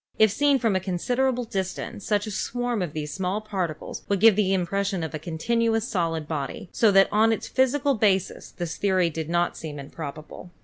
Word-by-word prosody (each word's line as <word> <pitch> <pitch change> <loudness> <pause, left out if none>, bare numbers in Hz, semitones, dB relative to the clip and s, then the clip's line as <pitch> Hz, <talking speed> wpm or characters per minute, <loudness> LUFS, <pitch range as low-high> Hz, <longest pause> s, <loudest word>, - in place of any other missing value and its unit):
If 220 -2 +5
seen 285 +5 +3
from 225 -5 +1
a - - +3
considerable 245 +8 0
distance 190 -2 -4
such 205 -1 +1
a 215 - -5
swarm 245 +1 -2
of 170 -5 -3
these 150 -1 -4
small 190 +3 -1
particles 190 -7 -4
would 200 -1 +1
give 220 0 +7
the 200 -2 +2
impression 195 0 0
of 160 -1 -5
a 155 - -3
continuous 225 +8 0
solid 165 - -1
body, 150 +2 -4
so 225 - +4
that 195 -1 +6
on 220 +2 +4
its 225 - -2
physical 275 +2 +2
basis 200 -5 0
this 170 -2 -5
theory 185 -4 +2
did 160 0 -5
not 175 0 +1
seem 150 -2 -7
improbable. 150 +4 -8
195 Hz, 190 wpm, -25 LUFS, 170-225 Hz, -, give